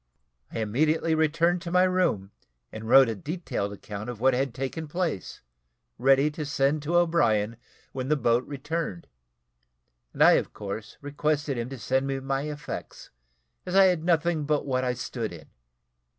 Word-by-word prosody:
I - - -6
immediately 155 +9 +1
returned 165 +3 +2
to 170 - -6
my 180 +1 +5
room, 180 - +1 0.4
and 110 0 -8
wrote 135 +1 +8
a 115 - -1
detailed 145 - -4
account 105 +2 -7
of 120 -3 -6
what 130 +2 +4
had 135 +1 0
taken 135 +6 -4
place, 160 - -3 0.6
ready 135 +3 +4
to 150 +1 -5
send 145 +1 +1
to 160 +4 -2
O'Brien, 130 -11 +2 0.4
when 130 -1 -4
the 150 - +4
boat 120 -2 +2
returned, 145 - -4 1.1
and - - +2
I, - - +8
of - - -13
course, 105 +2 -7
requested 145 0 -1
him 120 +1 -3
to 135 - -7
send 130 +3 0
me 135 0 -2
my 135 +2 -2
effects, 150 0 -7 0.5
as 180 0 -4
I 195 - +8
had 180 -4 +2
nothing 165 -2 +1
but 150 0 0
what 130 -2 0
I 125 -1 0
stood 120 -3 -4
in. 80 -3 -12
140 Hz, 165 wpm, -27 LUFS, 120-160 Hz, 1.1 s, wrote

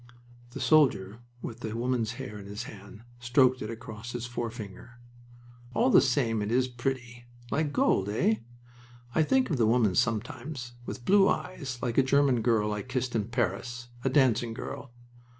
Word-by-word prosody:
The - - -6
soldier 115 -10 +3 0.2
with 120 -1 -6
the 110 -1 -4
woman's 120 -2 0
hair 125 -5 -7
in 100 - -10
his 105 +3 -5
hand 105 0 -11 0.2
stroked 125 +1 +3
it 105 - -4
across 115 0 -7
his 120 -1 -3
forefinger. 120 -1 -6 0.8
"All - - +3
the - - +8
same 125 -4 +1
it 105 +1 -2
is 130 +1 +3
pretty. 120 -1 -4 0.3
Like 155 -1 0
gold, 100 -8 +2
eh? 110 +1 +2 0.8
I - - +3
think 255 +8 +2
of 145 - +1
the 115 -3 +3
woman, 115 -4 +3
sometimes. 120 +5 -2 0.2
With 120 - -6
blue 195 0 +5
eyes, 140 -9 -3
like 120 0 +1
a - - +6
German 135 -2 +3
girl 110 -2 +2
I 105 - -3
kissed 130 +1 -3
in 105 -3 +1
Paris 120 0 -2
a 135 - +2
dancing 120 -4 +2
girl!" 135 0 -7
120 Hz, 170 wpm, -29 LUFS, 110-130 Hz, 0.8 s, the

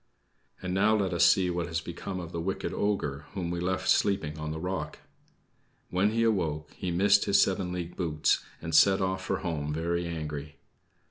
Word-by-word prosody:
And 90 0 -2
now 105 +3 +4
let 95 -3 0
us 85 - +3
see 90 -2 +5
what 85 -1 -2
has 80 -1 -1
become 85 +3 -6
of 85 -2 -7
the 85 - -3
wicked 95 +3 -3
ogre, 75 -9 -1
whom 90 -3 -2
we 85 - -2
left 95 +2 -1
sleeping 95 -7 +2
on 75 0 -4
the 80 +1 -4
rock. 90 -3 -3 0.9
When 95 +3 +3
he 115 +1 +1
awoke 80 -9 0
he 90 - -4
missed 100 +4 +4
his 100 - +4
seven 95 -2 +2
league 90 -1 -5
boots, 80 -4 +1 0.2
and 80 -1 -4
set 95 +5 +6
off 95 0 -1
for - - -2
home 75 -5 -2
very 85 +2 -1
angry. 75 -3 -5
90 Hz, 190 wpm, -29 LUFS, 80-95 Hz, 0.9 s, set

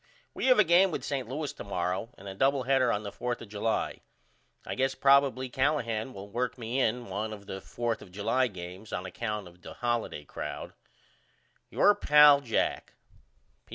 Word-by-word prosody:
We - - -2
have 255 - +6
a 215 - +7
game 180 +2 +5
with 165 - -4
St. 130 -5 -3
Louis 145 +2 -3
to - - -8
morrow 95 +2 -2
and 100 - -12
a 95 - -5
double 135 +6 +2
header 130 -1 +3
on 105 -1 -1
the 100 - -5
4th 120 +2 -3
of 115 - -10
July. 110 +2 -2 0.6
I - - -4
guess 135 +1 0
probily 135 -1 +4
Callahan 130 -4 0
will 100 -3 -9
work 120 +5 -2
me 120 +2 -3
in 120 -1 0
one 105 +2 -4
of 100 -2 -9
the 95 -1 -6
4th 120 -1 -3
of 90 - -13
July 115 +7 +1
games 95 +1 -9
on 90 - -3
account 105 +1 -4
of 90 +1 -17
the - - -10
holiday 120 -11 -2
crowd. - - -6 1.0
Your 205 - +5
pal, 150 -7 +6
JACK. 120 -5 -1
120 Hz, 185 wpm, -29 LUFS, 100-135 Hz, 1.0 s, a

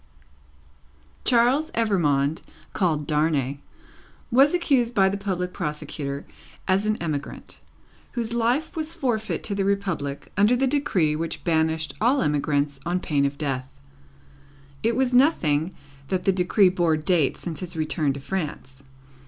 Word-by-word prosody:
Charles 255 +6 +3
Evrémonde, 160 -10 +1 0.3
called 160 -6 0
Darnay, 150 -3 0 0.7
was 275 +7 +5
accused 260 -8 +1
by 190 -2 +5
the 195 - -2
public 185 -3 -3
prosecutor 145 -1 -4 0.4
as 195 +2 +2
an 215 - +2
emigrant, 150 -4 -5 0.5
whose 235 -1 -3
life 240 +9 0
was 320 0 -2
forfeit 240 -9 -1
to 205 - -3
the 200 0 0
Republic, 190 -8 -2
under 210 +5 +4
the 265 +2 +2
decree 225 - +1
which 165 +1 -4
banished 160 -1 0
all 250 +5 +3
emigrants 145 -1 0
on 175 +2 -1
pain 145 -5 +1
of 140 0 -2
Death. 130 -3 -3 1.1
It 230 +1 +1
was 255 0 +1
nothing 180 - +3 0.4
that 185 +2 -1
the 195 - +5
decree 185 +2 +4
bore 175 -3 +1
date 155 -2 +1
since 165 -3 -6
his 180 -2 -6
return 155 -2 0
to 140 - -7
France. 140 -5 -5
180 Hz, 135 wpm, -24 LUFS, 150-230 Hz, 1.1 s, was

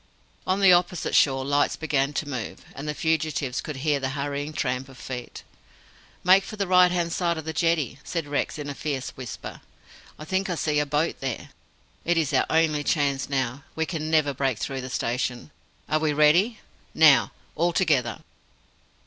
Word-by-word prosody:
On 190 +2 +1
the 190 -2 +8
opposite 175 0 +1
shore 135 -2 +3
lights 145 +1 +2
began 145 -3 0
to 150 - -2
move, 130 -6 -6
and 140 +2 -7
the 150 - -2
fugitives 155 -5 -1
could 155 - -6
hear 145 +1 0
the 130 -1 -2
hurrying 145 +1 -3
tramp 130 -3 -2
of 130 - -14
feet. 125 0 -7 0.8
"Make 190 +2 +6
for 215 - -8
the 200 -1 -1
right 180 -1 +6
hand 170 -1 -1
side 170 -2 0
of 160 - -6
the 160 - -3
jetty," 155 -5 0
said 165 -3 -3
Rex 145 +1 -2
in 145 -1 -5
a 145 - -4
fierce 140 -2 -4
whisper. 130 -3 -8 0.6
"I 150 - -9
think 190 +3 -1
I 175 - -1
see 150 -2 0
a 150 - 0
boat 150 +3 0
there. 130 -3 -4 0.5
It 175 0 +1
is 160 -4 0
our - - +3
only 155 -2 +2
chance 140 -3 0
now. 135 0 -2
We 160 - 0
can 155 -2 -4
never 155 -3 +2
break 135 -3 0
through 135 +3 -4
the 130 - -6
station. 125 +3 -2 0.4
Are 155 - +1
we 155 -1 +1
ready? 170 +10 +3 0.3
Now! - - +6 0.2
All 175 +1 +2
together!" 145 - +1
150 Hz, 185 wpm, -25 LUFS, 135-165 Hz, 0.8 s, the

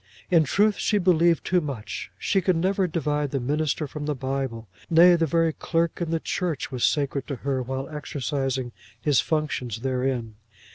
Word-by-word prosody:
In 165 -3 +5
truth 205 +8 +2
she 210 - +1
believed 170 -3 +3
too 180 -1 +2
much. 135 -8 -5
She 195 - +1
could 185 0 +2
never 190 +3 +1
divide 150 -3 -1
the 135 - -1
minister 150 +4 -1
from 145 +1 -6
the 150 - 0
Bible; 130 -4 -3 0.2
nay, 175 +2 +7
the 165 -1 +1
very 165 +1 +2
clerk 165 +2 -1
in 170 - -1
the 165 0 0
church 165 -5 -2
was 125 -2 -3
sacred 140 -2 +1
to 140 - -3
her 135 -2 0
while 130 +2 -4
exercising 135 -3 -3 0.3
his 145 +1 +2
functions 135 -8 -1
therein. 125 -4 -2
150 Hz, 175 wpm, -25 LUFS, 130-165 Hz, 0.3 s, nay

